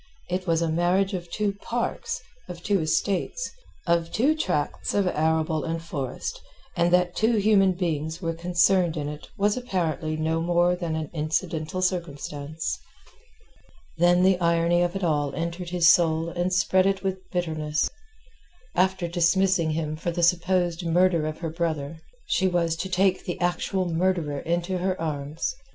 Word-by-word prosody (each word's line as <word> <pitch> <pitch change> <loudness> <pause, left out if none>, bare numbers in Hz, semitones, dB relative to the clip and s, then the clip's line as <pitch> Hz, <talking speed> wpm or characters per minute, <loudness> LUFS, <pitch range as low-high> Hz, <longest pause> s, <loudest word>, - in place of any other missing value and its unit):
It 180 +1 -2
was 165 0 +2
a 165 - 0
marriage 180 +4 +2
of 175 -2 -4
two 205 +2 -1
parks, 240 0 -2 0.3
of 175 -1 -8
two 200 -4 +1
estates, 195 - -1 0.3
of 170 -1 +1
two 280 +8 +2
tracts 180 - -1
of 200 -1 +3
arable 160 -1 +1
and 165 0 -2
forest, 145 -6 -5 0.3
and 170 0 +2
that 180 0 +3
two 225 +2 +2
human 200 -3 +4
beings 160 -3 -2
were 165 -2 -2
concerned 175 0 +2
in 145 -1 -2
it 150 0 -7
was 205 +1 +2
apparently 170 -10 -2
no 160 +1 0
more 175 +1 +2
than 170 -3 -3
an 155 -2 -4
incidental 160 +2 -2
circumstance. 155 -3 -3 1.2
Then 175 +1 +5
the 190 -1 +4
irony 170 0 +2
of 175 +1 0
it 195 - -3
all 145 -4 0
entered 170 +1 -4
his 175 -2 +3
soul 165 0 +4
and 175 +1 -1
spread 185 0 +3
it 195 0 0
with 190 -1 -3
bitterness. 155 -3 -1 0.9
After 185 0 +1
dismissing 175 0 +2
him 155 -1 -2
for 160 +3 -3
the 170 0 -1
supposed 175 0 +2
murder 170 -1 +2
of 155 - -4
her 165 -2 -3
brother, 160 -2 -3 0.3
she 190 - +1
was 170 -2 +1
to 190 +3 -4
take 185 0 +2
the 175 - -4
actual 180 +1 0
murderer 165 -4 0 0.2
to 185 +1 -2
her 185 +1 -1
arms. 150 -1 -3
175 Hz, 160 wpm, -25 LUFS, 160-185 Hz, 1.2 s, Then